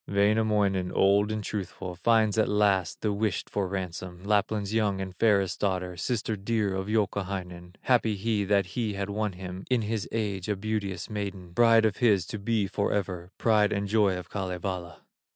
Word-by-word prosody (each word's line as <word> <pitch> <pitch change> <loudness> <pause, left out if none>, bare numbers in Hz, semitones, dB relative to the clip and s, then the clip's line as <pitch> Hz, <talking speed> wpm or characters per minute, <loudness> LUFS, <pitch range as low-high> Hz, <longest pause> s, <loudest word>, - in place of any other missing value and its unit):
Wainamoinen, 100 -2 +2
old 100 +2 +3
and 110 -1 -3
truthful, 95 -3 -5
Finds 110 +3 +2
at 110 - +3
last 100 -3 +1
the 105 -2 0
wished 100 -2 -1
for 100 -2 -1
ransom, 90 -1 -5
Lapland's 105 0 0
young 105 -3 +1
and 95 -1 -5
fairest 100 -4 +2
daughter, 90 -2 -1
Sister 110 +4 -2
dear 105 0 -1
of 95 +1 -3
Youkahainen; 95 -4 -2
Happy 115 -4 +2
he, 105 +1 0
that 100 0 +3
he 105 +3 -3
has 100 0 -3
won 105 0 -1
him, 90 +1 -7
In 125 -3 +2
his 105 -1 -3
age 100 -4 -2
a 105 - +1
beauteous 100 -2 -3
maiden, 100 -4 -5
Bride 115 +3 +5
of 105 -2 +1
his 105 -8 +3
to 110 - -6
be 110 0 0
forever, 95 -3 -2
Pride 105 -2 +3
and 100 0 -1
joy 100 -3 +2
of 90 -1 -7
Kalevala. 90 -2 -4
100 Hz, 170 wpm, -28 LUFS, 95-110 Hz, -, Bride